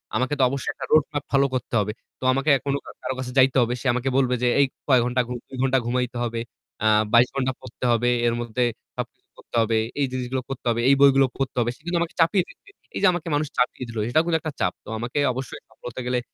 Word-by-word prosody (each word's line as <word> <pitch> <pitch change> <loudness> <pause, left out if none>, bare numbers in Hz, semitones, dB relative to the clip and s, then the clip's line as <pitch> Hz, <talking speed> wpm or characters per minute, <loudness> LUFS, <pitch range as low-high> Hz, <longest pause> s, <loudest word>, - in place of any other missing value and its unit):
আমাকে 130 +3 0
তো - - +5
অবশ্যই 140 0 -2
একটা - - -6
road 155 -2 +6
map 145 -1 -2
follow 140 0 +3
করতে 125 - -4
হবে। 105 +1 -1 0.3
তো - - -11
আমাকে 135 +3 0
এ্যা 135 - +2
কোনো 140 0 0 0.3
কারো - - -2
কাছে 125 -1 -4
যাইতে 130 0 +5
হবে। 120 +1 +1
সে - - -12
আমাকে 125 +2 -1
বলবে 125 -2 +2
যে - - +4
এই 140 - +6 0.2
কয় 130 -3 +5
ঘণ্টা 125 +1 +1
ঘু 125 - -4
২ 130 - -9
ঘণ্টা 135 0 +3
ঘুমাইতে 125 0 -1
হবে, 115 -1 -2 0.4
আ - - +5 0.3
২২ 120 +1 +7
ঘণ্টা 130 -1 0
পড়তে 125 0 -7
হবে, 120 +1 +2 0.2
এর 115 - +2
মধ্যে 120 +1 -1 0.3
সবকিছু - - -7
করতে - - -12
হবে, 110 0 +1 0.2
এই 140 - +3
জিনিসগুলো 130 0 -2
করতে 135 - -6
হবে, 115 0 +1
এই 140 - +6
বইগুলো 135 -1 +6
পড়তে 135 -2 -2
হবে। 120 0 +1
সে 125 - -25
কিন্তু 175 0 0
আমাকে 170 - -3
চাপিয়ে 170 +3 +4
দিচ্ছে। - - -18 0.3
এই - - -1
যে 200 - +7
আমাকে 175 -1 -4
মানুষ 150 +1 0
চাপিয়ে 125 +1 0
দিল 115 - -7
সেটাও 155 +7 +3
কিন্তু 170 -1 +2
একটা 155 -1 -4
চাপ। - - +1
তো - - -10
আমাকে 120 +5 -3
অবশ্যই 130 -1 -6
সফল 110 - -21
হতে 130 - -7
গেলে 125 0 +1
130 Hz, 250 wpm, -24 LUFS, 120-140 Hz, 0.4 s, ২২